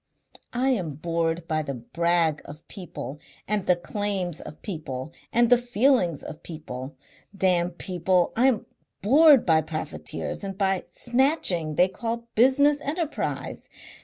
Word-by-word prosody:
I 255 +2 +2
am 180 - -1
bored 165 +1 -1
by 155 -1 0
the 140 -3 -4
brag 165 +5 +1
of 150 +2 -12
people 175 -6 -7 0.3
and 210 -2 0
the 180 - +5
claims 190 -2 -3
of 150 - -11
people 155 -6 -5 0.2
and 240 +1 +3
the 245 - +7
feelings 240 - +2
of 155 - -8
people. 135 -5 -7 0.4
Damn 180 -2 +3
people! 180 0 0
I 250 +3 +4
am 245 -6 +1 0.4
bored 285 +4 +7
by 160 -2 +4
profiteers 155 +5 -5
and 195 -1 -5
by 195 -2 +2
the - - -16
snatching 240 - +1
they 180 - +5
call 230 +4 -4
business 285 +5 +4
enterprise. 315 +2 -3
180 Hz, 140 wpm, -25 LUFS, 160-240 Hz, 0.4 s, the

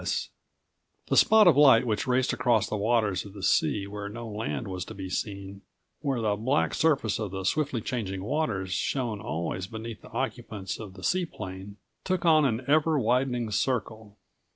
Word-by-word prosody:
S. - - -2 0.8
The - - +2
spot 220 -2 +6
of 170 - +7
light 135 -4 +6
which 110 0 -1
raced 125 0 +2
across 120 -4 +2
the - - -3
waters 105 -3 +1
of 100 - -11
the 100 -2 -9
sea 100 +4 +2
where 100 0 -6
no 115 +2 -7
land 105 -10 -4
was 90 -2 -4
to - - -9
be 95 -1 -6
seen, 100 0 -4 0.4
where 135 -5 -1
the 105 -2 +1
black 130 +8 0
surface 140 -10 +1
of 105 -2 -3
the 95 +1 -5
swiftly 140 +3 0
changing 95 -6 -3
waters 105 -8 -1
shone 115 -2 -1
always 90 0 -3
beneath 110 +1 -7
the - - -13
occupants 115 -6 -4
of 100 -4 -9
the 95 - -12
seaplane, 100 - -3 0.3
took 185 -2 -1
on 155 -3 +5
an 120 -1 0
ever 155 +2 +3
widening 125 -2 0
circle. 110 -2 -2
110 Hz, 175 wpm, -27 LUFS, 100-130 Hz, 0.8 s, of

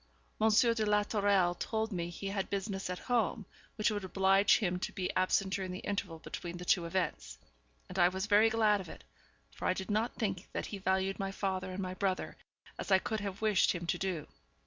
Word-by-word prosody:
Monsieur 220 +2 +5
de 225 -1 -1
la 210 0 +3
Tourelle 200 -4 +2
told 220 +5 -2
me 175 -3 -2
he 195 +3 -5
had 195 -1 -2
business 195 -1 -3
at 180 - -3
home, 230 -2 0 0.3
which 215 +1 +1
would 205 -2 -3
oblige 195 +1 +4
him 180 -4 -1
to 190 - -3
be 185 -2 -3
absent 190 +1 +2
during 190 -1 -2
the 180 - -4
interval 195 -5 -2
between 170 +2 -6
the 180 - -7
two 175 -1 +3
events; 185 +2 -2 0.5
and - - -5
I 175 - +7
was 190 +2 -2
very 215 +1 +5
glad 215 -2 +3
of 175 - -10
it, - - -11 0.5
for - - -7
I - - +3
did 190 +2 -4
not 220 +3 0
think 195 -5 -3
that - - -2
he 200 - -6
valued 190 +1 0
my 195 0 -2
father 190 -1 -2
and 185 +1 -4
my 185 0 -3
brother 185 -1 -2 0.4
as - - -5
I 190 - +8
could 220 +3 -2
have 200 +1 -5
wished 215 -3 +4
him 175 -1 -5
to - - -1
do. 185 -5 -2
195 Hz, 215 wpm, -32 LUFS, 185-210 Hz, 0.5 s, I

